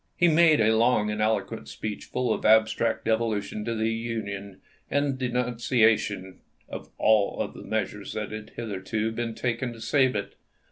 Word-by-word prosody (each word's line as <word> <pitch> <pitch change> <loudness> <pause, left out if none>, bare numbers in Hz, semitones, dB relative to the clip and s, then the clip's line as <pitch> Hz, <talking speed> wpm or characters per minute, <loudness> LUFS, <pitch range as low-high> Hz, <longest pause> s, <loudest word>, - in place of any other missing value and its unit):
He 175 - +4
made 160 -2 +5
a 110 0 +4
long 110 -2 +3
and 105 0 -2
eloquent 110 -9 -1
speech 105 +9 -6
full 125 -1 -1
of - - -5
abstract 110 +1 +3
devo 110 -1 +1
tion 105 +1 -6
to 115 - -2
the 110 0 0
Union 100 -4 -5 0.3
and 145 0 +1
of 135 - -2
denunciation 115 -6 +1 0.3
of - - -8
all 110 -2 +2
the - - -10
measures 105 -2 -3
that 105 -1 -4
had 110 0 -7
hitherto 110 0 -3
been 115 0 -4
taken 120 0 -2
to 115 - -12
save 130 +2 +2
it. 100 -1 -3
110 Hz, 170 wpm, -26 LUFS, 105-120 Hz, 0.3 s, made